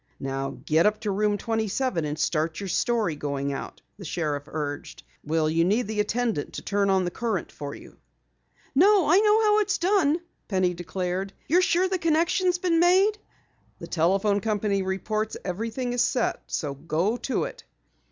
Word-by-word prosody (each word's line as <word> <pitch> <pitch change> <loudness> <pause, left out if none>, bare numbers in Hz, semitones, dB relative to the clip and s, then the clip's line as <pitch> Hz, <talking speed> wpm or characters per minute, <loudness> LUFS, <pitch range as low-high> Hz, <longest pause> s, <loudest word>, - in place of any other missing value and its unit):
"Now 135 0 -3
get 160 +5 +4
up 210 0 0
to 210 - -1
Room 205 +1 +1
27 220 - -1
and 150 +1 -3
start 160 0 0
your 200 -1 -5
story 220 -4 +1
going 140 -1 -3
out," 135 - -7 0.2
the - - -8
sheriff 150 -4 -2
urged. 145 -2 -5 0.2
"Will 155 +1 +1
you 165 +2 +2
need 210 +8 +2
the 210 0 -4
attendant 215 -5 -1
to - - -6
turn 200 -1 +1
on 190 -1 +3
the 175 - -2
current 220 -5 -2
for 145 -1 -7
you?" - - -14 0.8
"No, 380 +5 +5
I 365 - +7
know 425 +1 +4
how 420 0 +4
it's 410 -1 +1
done!" 350 -5 +2 0.3
Penny 185 -3 +1
declared. 180 +2 -3
"You're 350 +5 +4
sure 365 0 +2
the 370 -1 -1
connection 335 +3 +2
has 355 0 +3
been 350 -2 +1
made?" 380 +5 +4 0.6
"The - - -8
telephone 195 +5 +2
company 205 -2 0
reports 215 +3 -2
everything 230 +6 -3
is 245 - +1
set. 245 0 0
So 145 -4 -3
go 165 - -1
to 260 - -1
it!" - - -7
205 Hz, 175 wpm, -26 LUFS, 165-270 Hz, 0.8 s, I